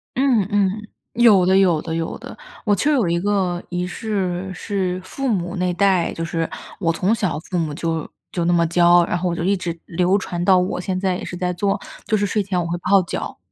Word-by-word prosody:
嗯 250 -7 +2
嗯， 205 +1 0 0.3
有 225 -6 +6
的 190 +1 +4
有 180 -5 +3
的 165 -1 -4
有 165 0 -3
的。 - - -10 0.3
我 205 -2 +3
就有 250 - +2
一 170 0 +1
个 185 -2 0
仪 180 0 -2
式 190 -3 -3
是 185 -1 -2
父 275 +8 -4
母 180 -5 -1
那 180 -1 0
代 185 -2 +2
就 165 - -4
是 165 -1 -2 0.3
我 165 -4 +1
从 190 +6 +1
小 190 -9 -1
父 180 +3 -4
母 160 -3 -1
就 165 0 -2 0.2
就 175 -2 -1
那 175 - +3
么 170 -1 +3
教， 175 +1 +5
然 175 - -1
后 180 +1 -1
我 170 - -2
就 170 - -3
一 195 +2 +2
直 175 -2 -4
流 180 +3 +2
传 175 -3 -4
到 190 -1 +6
我 180 0 -1
现 185 0 -2
在 185 -2 0
也 - - -7
是 - - -6
在 180 0 -1
做， 195 +3 0 0.3
就 220 - +1
是 205 -1 +1
睡 210 +2 0
前 190 -2 -1
我 175 - -1
会 175 - -1
泡 190 +2 +4
脚。 170 - -5
180 Hz, 250 characters per minute, -21 LUFS, 175-200 Hz, 0.3 s, 有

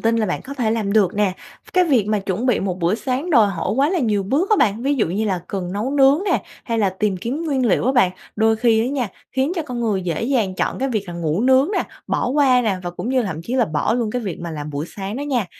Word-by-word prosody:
tin 230 0 +2
là 220 - +1
bạn 180 - -3
có 280 - -8
thể 240 -5 0
làm 215 -3 -1
được 210 -5 +3
nè. 205 -2 +1 0.4
Cái 365 0 +4
việc 255 - +2
mà 215 -1 +1
chuẩn 195 +5 -2
bị 250 - +2
một 185 -2 -2
bữa 175 +3 +1
sáng 265 +8 -2
đòi 225 -8 +5
hỏi 175 -4 -2
quá 275 +5 +2
là 365 - +1
nhiều 210 -7 +1
bước 285 - 0
á 430 - +5
bạn, 215 +2 +2
ví 280 +2 +1
dụ 240 -10 +1
như 200 +6 -1
là 190 -4 -1
cần 185 -2 -4
nấu 215 +6 -2
nướng 275 +1 +5
nè, - - +1 0.2
hay 230 -2 -1
là 200 -3 +2
tìm 190 0 -1
kiếm 250 - -4
nguyên 270 -6 0
liệu 200 - +2
á 265 - +3
bạn, 240 -8 +4 0.3
đôi 220 +1 +3
khi 225 -1 +3
á 235 - 0
nha, 255 -4 -1 0.2
khiến 265 +4 0
cho 330 - 0
con 250 -5 -5
người 210 -5 0
dễ 170 +2 -2
dàng 230 -7 0
chọn - - -2
cái 270 - 0
việc 215 -6 -2
là 175 - -6
ngủ 165 +1 -1
nướng 265 +4 +4
nè, - - +2 0.2
bỏ - - 0
qua 260 -2 +4
nè, 210 -4 0
và 175 - -4
cũng 175 +6 -6
như 260 0 +2
là - - -3
thậm 160 -4 -4
chí 240 +8 -4
là 250 - +3
bỏ 155 +8 0
luôn 235 -3 -1
cái 245 0 -2
việc 190 -5 -5
mà 170 0 -5
làm 150 -1 -5
bữa 145 +1 -3
sáng 200 +3 -4
đó 285 - -3
nha. 255 -8 -1
225 Hz, 295 wpm, -20 LUFS, 195-260 Hz, 0.4 s, đòi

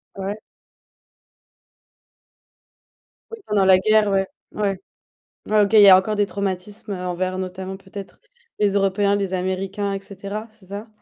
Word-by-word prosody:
Ouais. 195 +1 -4 2.9
Oui, 455 - -8
pendant 200 -2 +2
la 190 -1 +7
guerre, 215 +1 +3
ouais. 195 -1 +1 0.3
Ouais. 200 -3 -1 0.7
Ouais, 215 0 +4
OK, 205 +1 +1
il 215 - +8
y 200 - +9
a 185 - +10
encore 210 +3 -1
des 205 0 +2
traumatismes, 200 +2 -4
heu, 180 -1 -5
envers 185 +1 -2
notamment, 190 +1 -5
peut-être, 195 0 -10 0.4
les 205 -1 +3
Européens, 200 0 +2
les 195 -2 -2
Américains 190 +2 -2
et 195 - -3
cetera. 200 +2 -7
C'est 215 -4 -21
ça? 205 +3 -7
195 Hz, 145 wpm, -22 LUFS, 190-205 Hz, 2.9 s, a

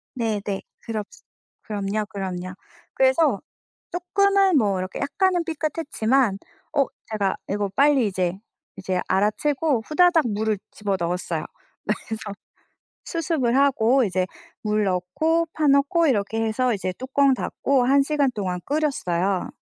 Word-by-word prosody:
네네. 210 -4 -2 0.2
그렇스 215 -3 -6 0.4
그럼요, 210 0 -2
그럼요. 185 -2 -5 0.4
그래서 265 -3 +3 0.5
쪼끔은 390 0 +3
뭐 200 -6 +2
이렇게 185 +1 -5
약간은 355 +4 +1
삐끗했지만 275 - 0 0.4
어 280 - +5 0.3
제가 200 -3 0
이거 205 0 -1
빨리 280 -4 +4
이제 185 -3 -1 0.4
이제 185 -1 -2
알아채고 255 +7 +1
후다닥 335 -2 +4
물을 215 0 0
집어넣었어요. 180 -5 -2 0.6
그래서 220 -1 -4 0.8
수습을 305 -7 0
하고 265 -2 +4
이제 185 -3 0 0.3
물 210 0 +1
넣고 205 - 0
파 305 -2 +1
넣고 280 +4 +4
이렇게 225 -3 0
해서 245 +3 +1
이제 185 -3 -3
뚜껑 270 +1 +2
닫고 260 0 0
1 275 +2 +5
시간 285 -1 +1
동안 185 -5 -2
끓였어요. 200 - 0
230 Hz, 275 characters per minute, -23 LUFS, 200-285 Hz, 0.8 s, 어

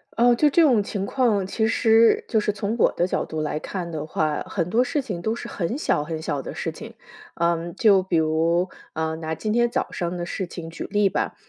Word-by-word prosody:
哦， 240 +1 +5
就 295 +5 +4
这 330 +4 +4
种 245 -8 +4
情 195 -1 -3
况， 215 -6 +1
其 220 +3 0
实 225 0 +4
就 220 - +2
是 210 - 0
从 205 +2 -3
我 - - +4
的 175 - +1
角 - - -1
度 155 -1 -4
来 150 0 -2
看 175 0 -5
的 155 -1 -4
话， 155 -1 -1
很 175 -4 -1
多 235 +5 +3
事 280 +3 -1
情 195 -10 -5
都 220 +4 -1
是 - - -7
很 205 +8 -3
小 150 - 0
很 160 0 -5
小 140 -3 -2
的 - - -7
事 - - -3
情。 - - -10 0.4
嗯， 170 0 -1
就 200 -5 +5
比 180 -3 0
如， 165 +3 +2 0.3
啊， 160 0 -2
拿 160 0 -4
今 215 +4 -2
天 240 0 +3
早 - - -2
上 175 0 -3
的 175 - -3
事 180 +1 -4
情 170 -1 -8
举 165 - -7
例 205 -1 +2
吧。 - - -2
185 Hz, 250 characters per minute, -23 LUFS, 165-220 Hz, 0.4 s, 哦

